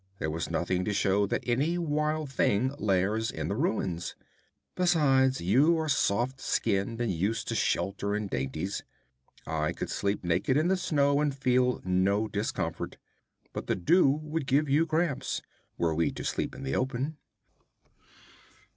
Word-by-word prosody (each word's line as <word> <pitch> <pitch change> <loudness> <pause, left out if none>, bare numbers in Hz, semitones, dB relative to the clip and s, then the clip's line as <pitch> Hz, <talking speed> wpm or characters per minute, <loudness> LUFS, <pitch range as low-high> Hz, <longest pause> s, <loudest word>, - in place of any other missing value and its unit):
There 80 - -2
was 80 +2 -3
nothing 90 +1 0
to 105 - -1
show 100 +1 +2
that - - -2
any 140 +8 +1
wild 155 -2 -1
thing 130 0 +1
lairs 105 +3 +1
in - - -4
the 100 - -1
ruins. 95 - -1 0.6
Besides, 140 -7 +3
you 140 - +4
are 160 -1 -1
soft 130 0 +1
skinned, 110 +1 0
and 120 -4 0
used 100 +7 -1
to - - -1
shelter 100 +1 0
and 105 -1 -2
dainties. 80 +6 -3 0.6
I 75 -1 -1
could - - -5
sleep 100 0 -1
naked 90 +10 +1
in 160 +4 +2
the 190 - +4
snow 140 -5 +2
and 150 -2 0
feel 125 -2 +2
no 95 +4 +2
discomfort, 105 +1 -3 0.6
but - - -5
the - - +1
dew 140 - +4
would 155 0 -2
give 145 +4 +3
you 150 +4 +3
cramps, 160 -3 -1 0.3
were 85 -2 +1
we 85 +1 +1
to - - -6
sleep - - -2
in - - -8
the 65 0 -2
open.' 135 +4 -2
120 Hz, 155 wpm, -29 LUFS, 95-150 Hz, 0.6 s, you